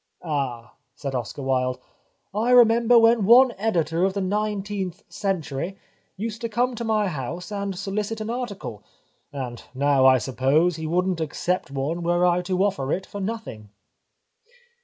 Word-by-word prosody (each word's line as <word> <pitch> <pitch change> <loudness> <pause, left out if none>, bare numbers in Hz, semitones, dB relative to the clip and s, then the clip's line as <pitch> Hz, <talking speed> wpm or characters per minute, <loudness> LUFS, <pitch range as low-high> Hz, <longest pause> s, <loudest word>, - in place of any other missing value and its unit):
" - - -47
Ah," 135 -7 -3 0.2
said 140 -2 -5
Oscar 125 +2 -4
Wilde, 130 -1 0 0.3
" - - -46
I 220 +4 0
remember 235 -1 +6
when 230 -1 +5
one 245 +5 +7
editor 170 -6 0
of 190 0 +2
the - - 0
Nineteenth 205 -1 -2
Century 180 -2 -3 0.4
used 220 +2 -4
to 230 - -2
come 245 +3 0
to 235 - -5
my 215 -2 +1
house 170 - -5
and 200 -1 -3
solicit 210 +3 -3
an 215 +1 -3
article, 200 - -5 0.5
and 125 -4 -6
now 140 -1 +4
I 130 0 +7
suppose 135 +8 +1
he 160 0 -4
wouldn't 180 +1 0
accept 175 +3 -2
one 140 +5 -2
were 175 +1 +2
I 180 0 +3
to 185 +1 0
offer 185 -9 -1
it 190 - -1
for 205 - -7
nothing." 195 - -5
185 Hz, 160 wpm, -24 LUFS, 140-215 Hz, 0.5 s, one